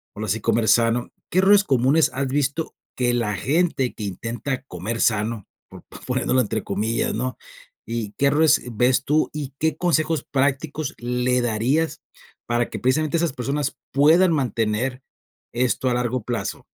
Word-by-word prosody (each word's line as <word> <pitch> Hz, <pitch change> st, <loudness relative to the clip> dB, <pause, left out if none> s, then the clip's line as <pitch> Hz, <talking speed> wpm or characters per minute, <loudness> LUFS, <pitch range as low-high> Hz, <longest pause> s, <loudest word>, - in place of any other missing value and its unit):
ahora 110 Hz, +1 st, -4 dB
sí, 110 Hz, +3 st, 0 dB
comer 110 Hz, +1 st, +1 dB
sano, 115 Hz, +2 st, +3 dB, 0.2 s
¿qué 185 Hz, -, +3 dB
errores 200 Hz, +1 st, +6 dB
comunes 135 Hz, +2 st, +3 dB
has 135 Hz, 0 st, -1 dB
visto 145 Hz, +3 st, -1 dB, 0.2 s
que 125 Hz, -1 st, +1 dB
la 105 Hz, -4 st, -1 dB
gente 145 Hz, -, 0 dB
que 110 Hz, -, -7 dB
intenta 115 Hz, +7 st, -4 dB
"comer 110 Hz, +1 st, -5 dB
sano", 110 Hz, -1 st, 0 dB, 0.2 s
po -, -, -13 dB, 0.2 s
poniéndolo 130 Hz, -, +1 dB
entre 110 Hz, -1 st, -2 dB
comillas, 105 Hz, +4 st, -1 dB
¿no? 125 Hz, +3 st, -3 dB, 0.5 s
Y, 115 Hz, -3 st, -4 dB
¿qué 140 Hz, -, +3 dB
errores 155 Hz, +2 st, +4 dB
ves 125 Hz, +3 st, +2 dB
tú? 155 Hz, +2 st, +2 dB
¿Y 145 Hz, -3 st, -5 dB
qué 160 Hz, 0 st, 0 dB
consejos 160 Hz, -2 st, +1 dB
prácticos 140 Hz, +2 st, -1 dB
le 125 Hz, +1 st, 0 dB
darías 120 Hz, +8 st, 0 dB, 0.4 s
para 120 Hz, 0 st, 0 dB
que -, -, -5 dB
precisamente 155 Hz, +6 st, +1 dB
esas 165 Hz, -2 st, 0 dB
personas 140 Hz, +2 st, -2 dB, 0.2 s
puedan 165 Hz, +6 st, +5 dB
mantener 125 Hz, -1 st, -1 dB, 0.5 s
esto, 125 Hz, +1 st, 0 dB
a 125 Hz, -, +1 dB
largo 125 Hz, -1 st, -1 dB
plazo? 120 Hz, 0 st, -4 dB
125 Hz, 155 wpm, -23 LUFS, 115-145 Hz, 0.5 s, errores